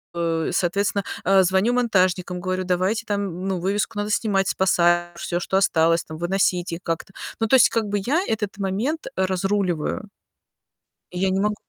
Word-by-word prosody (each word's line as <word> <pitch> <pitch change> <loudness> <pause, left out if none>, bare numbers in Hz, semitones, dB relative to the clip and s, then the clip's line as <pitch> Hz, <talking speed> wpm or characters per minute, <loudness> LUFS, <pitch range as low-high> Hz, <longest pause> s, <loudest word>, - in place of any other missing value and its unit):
э, 165 -1 -1
соответственно, 195 +3 0 0.2
э, 195 0 +5
звоню 190 +6 +2
монтажникам, 185 -6 +1
говорю: 185 0 -2
"Давайте 185 +5 0
там, 195 -3 -3
ну, 190 -2 -1
вывеску 205 +5 -1
надо 205 0 -2
снимать, 200 -3 +1
спасать, 175 -2 +2
всё, 175 0 -2
что 190 - -1
осталось, 165 -3 +3
там, 160 - -9
выносить 180 0 0
их 165 - -4
как-то". 165 +3 -4 0.3
Ну, - - +3
то 265 - +5
есть, 250 - +6
как 230 -2 0
бы, 205 0 -1
я 300 +7 +2
этот 210 -3 -2
момент 215 +12 -2
разруливаю. 190 0 -1 1.0
И 180 - -6
я 190 +1 +1
не 190 +1 0
могу 210 +1 +1
190 Hz, 170 wpm, -23 LUFS, 175-205 Hz, 1.0 s, есть